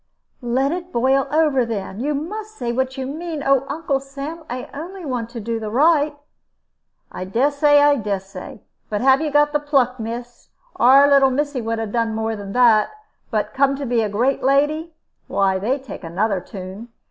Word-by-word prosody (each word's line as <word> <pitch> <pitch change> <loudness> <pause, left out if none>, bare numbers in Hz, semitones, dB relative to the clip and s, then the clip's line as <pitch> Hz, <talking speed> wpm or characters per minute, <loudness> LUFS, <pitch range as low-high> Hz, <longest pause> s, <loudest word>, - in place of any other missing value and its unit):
"Let 260 +3 0
it 355 +1 -5
boil 265 +3 +2
over, 300 -4 +2
then. 210 -3 -5
You 290 +4 -1
must 420 +9 -6
say 240 -3 -2
what 260 +2 -2
you 265 - -3
mean. 310 +2 -5
Oh, 275 0 +3
Uncle 285 -2 -1
Sam, 275 +4 -7
I 250 +1 -5
only 345 +5 -7
want 245 -4 -3
to 235 - -7
do 230 +1 -3
the 215 -1 -5
right!" 295 +4 +3 0.9
"I - - -6
dessay. 285 +8 +3
I 290 0 +5
dessay. 195 -3 -5 0.3
But 210 -1 -2
have 265 +2 +4
you 315 - -1
got 295 0 +3
the 295 - +2
pluck, 270 -4 +1
miss? 235 +2 -7 0.3
Our 270 +4 +7
little 275 -1 +5
missy 285 0 -1
would 225 0 -2
'a 225 - -2
done 225 +1 -1
more 220 0 -2
than 200 -1 -7
that. 235 -4 +5 0.4
But 210 -2 -2
come 275 0 +2
to 280 0 -5
be 235 -2 +1
great 245 +7 0
lady 300 +4 +1 0.3
why, 190 -1 +1
they 240 +8 0
take 265 -7 -10
another 190 +4 -1
tune. 190 +5 -9
260 Hz, 180 wpm, -21 LUFS, 225-290 Hz, 0.9 s, Our